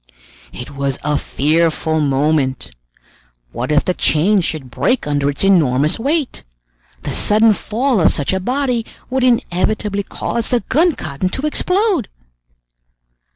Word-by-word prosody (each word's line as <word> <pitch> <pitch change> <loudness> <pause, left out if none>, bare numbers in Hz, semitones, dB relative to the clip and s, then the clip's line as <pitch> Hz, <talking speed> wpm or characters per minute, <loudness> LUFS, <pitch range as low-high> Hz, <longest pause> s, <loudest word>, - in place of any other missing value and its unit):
It 125 - -9
was 140 -1 -2
a 150 0 0
fearful 160 +2 0
moment! 135 - 0 0.8
What 125 +4 -4
if 150 - +2
the 180 - +1
chains 180 +5 +2
should 135 -6 -5
break 250 - 0
under 145 -1 0
its 145 - -2
enormous 155 - +3
weight? 285 +3 -1 0.6
The - - -4
sudden 215 +1 +3
fall 230 +2 0
of - - +5
such 145 +5 -1
a 190 - 0
body 250 +2 -1 0.3
would 260 0 0
inevitably 210 -3 0
cause 230 +3 -3
the 245 - +1
gun 315 - +1
cotton 150 +5 -3
to 265 +9 -4
explode! 365 - +1
185 Hz, 135 wpm, -17 LUFS, 145-245 Hz, 0.8 s, of